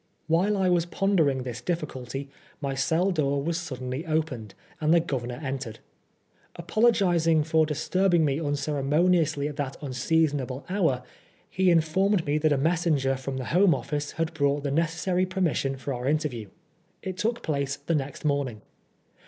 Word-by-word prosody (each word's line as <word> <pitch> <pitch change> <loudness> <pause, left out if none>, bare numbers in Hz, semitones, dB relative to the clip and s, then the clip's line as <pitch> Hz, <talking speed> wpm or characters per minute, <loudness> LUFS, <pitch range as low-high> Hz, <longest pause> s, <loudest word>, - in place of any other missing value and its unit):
While 180 +6 +2
I 190 -1 +2
was 175 -1 +2
pondering 165 -9 +1
this 120 -2 -6
diffi 170 -3 -1
culty, 135 +2 -7 0.3
my 140 -2 -2
cell 160 +8 +1
door 140 -5 +1
was 165 +2 -1
suddenly 130 -3 -5
opened, 155 -9 -2 0.2
and 155 0 +1
the 170 - +6
Governor 125 -6 -3
entered. 130 -5 -4 0.8
Apologising 175 -5 +3
for 160 0 +2
disturbing 175 +2 +2
me 140 0 0
UU' 145 -3 -1
ceremoniously 150 +2 +1
at 150 - -7
that 140 -2 -3
unseasonable 140 -1 0
hour, 165 -10 +1 0.4
he 190 0 +2
informed 175 +3 +2
me 145 +1 +1
that 155 0 +2
a 145 - +3
messenger 155 -3 +1
from 130 0 -5
the 130 - -4
Home 180 0 +5
Office 150 -1 -4
had 165 0 -2
brought 145 -2 +1
the 140 - -1
necessary 170 +4 0
permission 170 -8 0
for 135 +1 -4
our 125 +1 -4
interview. 140 - -1 0.5
It 190 -1 -4
took 230 +5 -1
place 140 -2 -1
the 145 +3 -3
next 145 -1 -3
morning. 140 -7 -1
150 Hz, 160 wpm, -26 LUFS, 135-170 Hz, 0.8 s, the